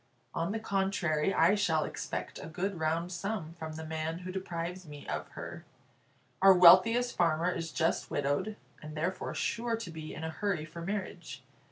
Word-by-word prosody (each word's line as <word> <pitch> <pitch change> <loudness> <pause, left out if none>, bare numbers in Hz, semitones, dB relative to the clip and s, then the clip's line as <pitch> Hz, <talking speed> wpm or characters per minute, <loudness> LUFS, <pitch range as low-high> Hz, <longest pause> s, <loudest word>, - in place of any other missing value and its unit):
On 165 +3 -1
the 225 - -2
contrary, 190 -6 +1
I 175 0 +5
shall 170 -7 +2
expect - - -5
a - - -7
good 180 +3 -3
round 165 +3 0
sum 180 -2 -3
from 160 -1 -5
the 160 +1 -6
man 160 +1 -3
who 185 - -4
deprives 180 -1 -4
me 145 -1 -10
of 75 0 -3
her. - - -7 0.8
Our 195 0 +8
wealthiest 185 +8 +7
farmer 170 +1 +2
is 165 -2 -4
just 165 0 0
widowed, 145 +9 0 0.3
and 155 0 -8
therefore 180 +4 -2
sure 230 +1 0
to 225 -7 -6
be 155 -1 -7
in 160 - -6
a 160 - -2
hurry 180 -3 -1
for 165 +2 -9
marriage. 180 -7 -5
170 Hz, 175 wpm, -31 LUFS, 160-195 Hz, 0.8 s, Our